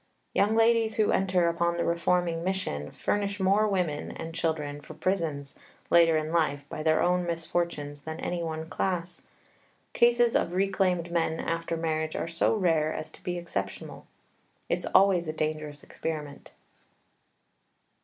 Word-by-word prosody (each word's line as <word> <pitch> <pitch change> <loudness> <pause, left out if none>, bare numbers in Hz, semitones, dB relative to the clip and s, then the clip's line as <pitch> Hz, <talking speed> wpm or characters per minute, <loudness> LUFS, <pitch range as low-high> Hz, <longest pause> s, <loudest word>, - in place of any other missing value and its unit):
Young 210 +2 +3
ladies 225 -1 +3
who 215 -1 +2
enter 185 -2 +2
upon 170 0 0
the 170 - 0
reforming 170 0 +1
mission 180 - -2
furnish 205 0 -2
more 200 +3 +3
women 180 -7 -1
and 165 0 -7
children 150 -3 -2
for 155 - -11
prisons, 155 -6 -2 0.4
later 165 -2 +6
in 155 0 -2
life, 145 -4 +1
by 165 -2 -5
their 155 0 +3
own 180 0 +2
misfortunes 165 -3 -2
than 160 +2 -6
any 175 -1 -2
one 160 -1 -4
class. 175 0 -2 0.7
Cases 240 0 +4
of 170 - +1
reclaimed 185 -2 +1
men 165 -1 0
after 165 0 -2
marriage 155 -1 -1
are - - -2
so 170 +6 +2
rare 165 -6 +2
as 155 0 -5
to - - -16
be 180 -1 -2
exceptional. 100 - -5 0.6
It's - - -1
always 185 -3 +4
a 155 - -2
dangerous 155 -2 -3
experiment. 150 -3 -6
170 Hz, 145 wpm, -28 LUFS, 155-185 Hz, 0.7 s, later